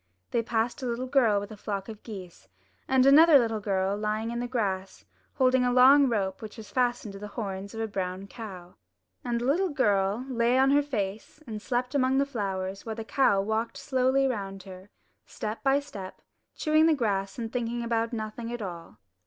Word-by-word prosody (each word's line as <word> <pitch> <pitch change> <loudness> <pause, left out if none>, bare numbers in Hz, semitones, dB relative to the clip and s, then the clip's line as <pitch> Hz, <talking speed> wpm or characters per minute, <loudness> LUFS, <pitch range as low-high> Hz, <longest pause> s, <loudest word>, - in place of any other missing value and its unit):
They 235 - +2
passed 230 +3 -1
a 255 - -3
little 240 +2 -2
girl 250 -6 +3
with 205 +2 -7
a - - -7
flock 200 -1 -4
of 220 -2 -9
geese, 190 -6 -10 0.4
and 265 -1 +4
another 300 +3 +8
little 225 -4 +1
girl 195 -1 0
lying 215 +2 -2
in 235 - -3
the 245 - -2
grass 195 -6 -3 0.3
holding 255 -1 +3
a 250 - +2
long 265 +2 +7
rope 195 -4 -1
which 215 -2 -9
was 220 -2 -10
fastened 240 -4 0
to 195 - -9
the 210 - -6
horns 200 -1 -5
of 225 - -3
a 225 - -1
brown 190 -1 -4
cow. 190 -5 -9 0.5
And 240 -1 -1
the - - -2
little 350 +8 +2
girl 210 -4 +1
lay 240 -1 +2
on 265 +1 +4
her 290 +1 +5
face 215 -3 -4
and 215 -4 -6
slept 250 +2 -2
among 265 -1 +2
the 280 - +3
flowers, 195 -6 -4
while 220 -1 -5
the 225 0 -6
cow 200 -3 +3
walked 220 +2 -2
slowly 260 0 +1
round 195 -6 -4
her, 185 +1 -12 0.4
step 215 +1 -5
by 270 +1 +3
step, 205 -10 -9 0.3
chewing 310 +1 +3
the 320 - +4
grass 195 -6 -1
and 225 -2 -5
thinking 240 -1 -2
about 230 -1 0
nothing 230 +1 -5
at 240 -2 -4
all. 170 - -8
225 Hz, 200 wpm, -28 LUFS, 200-255 Hz, 0.5 s, another